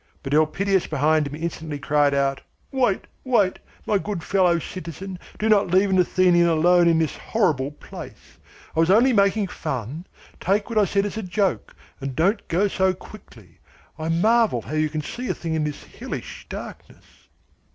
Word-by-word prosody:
But 135 0 -3
Elpidias 185 +5 +2
behind 155 0 +2
him 140 - -7
instantly 160 -2 -4
cried 145 0 +2
out: 135 -1 0 0.3
"Wait, 250 -8 +1 0.2
wait, 220 -8 +2 0.3
my 205 - +2
good 195 -4 -4
fellow 180 -3 +3
citizen, 185 +2 -7 0.2
do 215 - -1
not 210 -2 +4
leave 190 +3 +3
an 185 - +3
Athenian 180 -1 +4
alone 170 +2 +4
in 165 -1 +4
this 160 -2 0
horrible 150 - 0
place! 145 - -12 0.4
I - - 0
was 165 +1 +3
only 240 +7 +5
making 200 -1 +2
fun. 145 - -5 0.3
Take 205 +4 0
what 220 - +2
I 205 - +4
said 200 +1 0
as 205 - -4
a - - -2
joke, 190 0 -1 0.2
and 135 -2 -5
don't 195 +7 +1
go 190 +5 +2
so 190 -1 +1
quickly. 115 - -15 0.4
I 160 +1 -3
marvel 210 - +2
how 130 - -8
you 155 0 +1
can 155 0 -3
see 250 +10 -5
a - - 0
thing 165 -1 -4
in 155 -1 0
this 150 -1 -5
hellish - - -8
darkness." - - -9
175 Hz, 175 wpm, -23 LUFS, 155-200 Hz, 0.4 s, only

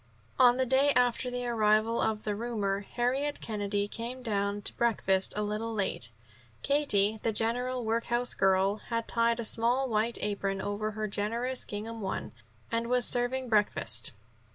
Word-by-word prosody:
On 245 0 +6
the 260 - +1
day 265 +3 +4
after 250 0 +2
the 245 0 -4
arrival 220 -1 +2
of 215 -1 -1
the 210 -1 -2
roomer, 205 -3 -2
Harriet 255 +7 -2
Kennedy 205 -2 -2
came 240 +4 -5
down 205 -2 -1
to - - 0
breakfast 195 -5 +2
a 210 - 0
little 215 +2 -3
late. 195 - -2 0.5
Katie, 220 -8 +3
the 225 - 0
general 240 +2 -1
housework 240 +2 0
girl, 195 +1 +3
had 230 +1 -4
tied 230 0 +1
a 235 - -1
small 240 +5 +2
white 225 0 0
apron 200 -1 -2
over 205 +2 -3
her 215 0 -4
generous 230 +6 -2
gingham 220 +2 -6
one, 190 -1 -4 0.4
and 230 0 -1
was 250 0 +2
serving 250 +1 +1
breakfast. 210 -7 +3
225 Hz, 155 wpm, -29 LUFS, 205-245 Hz, 0.5 s, On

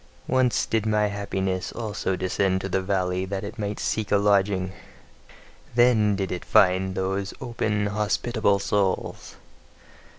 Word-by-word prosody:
Once 130 -2 +2
did 110 -1 -1
my 105 -1 +2
happiness 95 -2 -2
also 105 -4 -2
descend 95 +1 0
to 95 - -4
the 95 0 0
valley 95 -1 -1
that 95 +1 -4
it 105 +3 -7
might 105 0 -3
seek 110 -2 -2
a 100 - +5
lodging: 100 -2 +2 1.0
then 115 -4 +4
did 95 -2 -3
it 90 - -4
find 95 0 +3
those 95 +1 -2
open 110 -5 -1
hospitable 105 +1 +1
souls. 100 -1 -1
100 Hz, 135 wpm, -25 LUFS, 95-105 Hz, 1.0 s, a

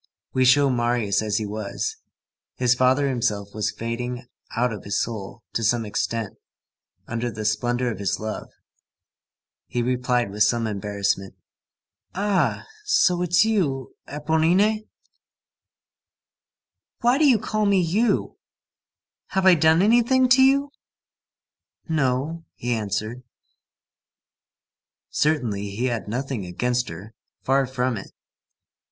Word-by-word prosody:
We 130 0 +3
show 140 +2 +5
Marius 120 -4 +1
as 105 -2 -1
he 110 - -2
was. 105 0 -4 0.6
His 125 -1 +3
father 130 +3 +3
himself 110 -6 -1
was 110 0 -1
fading 120 +3 -4 0.3
out 120 0 +1
of 105 - -8
his 100 0 -1
soul 110 0 -5
to 115 - -1
some 115 +1 +2
extent, 110 0 -3 0.7
under 120 +1 -3
the 110 -1 -6
splendor 120 +3 0
of 110 - -7
his 100 -3 -1
love. 110 0 -5 1.2
He 120 -1 -1
replied 125 -3 0
with 105 +1 -6
some 115 +2 +3
embarrassment:— 100 -2 -2 0.8
"Ah! 200 0 0 0.2
so 410 - +3
it's 175 +4 +3
you, 150 - 0
Éponine?" 165 +9 +1 2.1
"Why 245 +4 +3
do 310 - +5
you 245 - +5
call 215 -1 -1
me 200 -1 +4
you? 190 +7 0 0.9
Have 190 0 -1
I 190 - +8
done 160 +2 +4
anything 240 +4 +4
to 260 +1 +6
you?" 275 +2 +4 1.2
"No," 150 +1 -1
he 120 0 -2
answered. 110 +2 -3 1.9
Certainly, 120 -10 0
he 105 +6 -3
had 120 -4 -2
nothing 125 0 -3
against 125 +8 -1
her. 95 +7 -9 0.3
Far 135 0 +2
from 125 -2 -1
it. 95 - -8
125 Hz, 120 wpm, -24 LUFS, 110-165 Hz, 2.1 s, I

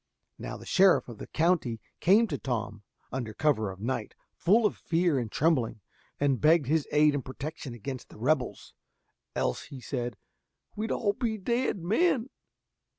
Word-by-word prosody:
Now - - -5
the - - -12
sheriff 190 -1 +4
of 115 - -9
the - - -7
country 160 -9 +1 0.2
came 210 +6 +5
to 145 - -3
Tom, 110 -5 -3 0.3
under 115 -4 -4
cover 130 -9 +1
of 95 -1 -8
night, 120 +6 -3 0.2
full 215 +6 +3
of 210 - +2
fear 165 -4 +1
and 115 -4 -4
trembling, 140 -9 +1 0.4
and 140 -3 +1
begged 155 -1 +5
his 150 +2 +1
aid 150 0 +5
and 145 -2 -2
protection 140 -1 -6
against 130 +2 -6
the - - -14
rebels, 130 +2 -1 0.6
"else," 60 - -1
said 120 -3 -3
he, - - -45 0.6
"we 215 +2 -2
be - - -4
all 205 -2 +1 0.3
dead 235 -5 0
men!" 255 - +2
145 Hz, 160 wpm, -29 LUFS, 120-180 Hz, 0.6 s, came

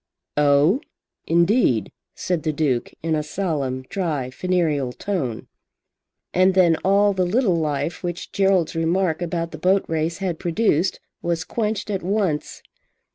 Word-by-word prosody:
"Oh, 150 - +4 0.5
indeed," 170 - +3 0.2
said 180 -3 -1
the 155 +1 0
Duke 145 -5 0
in 165 -1 0
a 155 - +1
solemn, 150 -6 -2
dry, 150 -5 -3
funereal 155 -6 0
tone. 135 - -3 0.9
And 185 +1 +4
then 175 -3 +5
all 200 +3 +3
the 185 -1 +1
little 190 +1 +2
life 150 +1 -2
which 175 -1 -5
Gerald's 190 -4 +2
remark 165 +1 0
about 170 -1 -2
the - - -8
boat 190 +2 +2
race 160 +1 -1
had 185 -4 -3
produced, 180 -1 +1 0.2
was 170 -1 -1
quenched 210 +3 -2
at 195 -2 -2
once. 185 -5 -1
170 Hz, 135 wpm, -22 LUFS, 150-190 Hz, 0.9 s, then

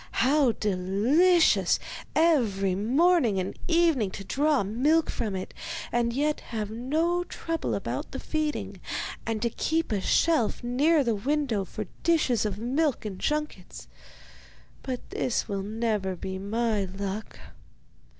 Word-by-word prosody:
How 275 -3 +4
delicious 220 - +3 0.4
every 225 - +3
morning 245 - +3
and 185 +1 -3
evening 330 - +3
to 200 - -7
draw 290 +4 +1
milk 280 +11 +2
from 215 -5 -3
it, 185 - -5 0.4
and 235 0 +1
yet 295 +4 0
have 215 -3 -5
no 315 +10 0
trouble 330 -2 -3
about - - -4
the - - -5
feeding, 310 -1 -3 0.5
and 225 -1 -1
to 235 - +1
keep 325 +4 -1
a 205 -3 0
shelf 305 - +2
near 285 +6 +3
the 235 -3 +1
window 255 -1 0
for - - -6 0.2
dishes 290 - +2
of 200 -2 -4
milk 260 +4 0
and 195 -3 -5
junkets! 245 - -3 0.9
But 255 -2 -5
this 250 - -1
will 200 -1 -2
never 210 -2 -1
be 190 +2 -5
my 215 0 0
luck. 195 +3 -5
235 Hz, 130 wpm, -27 LUFS, 200-305 Hz, 0.9 s, How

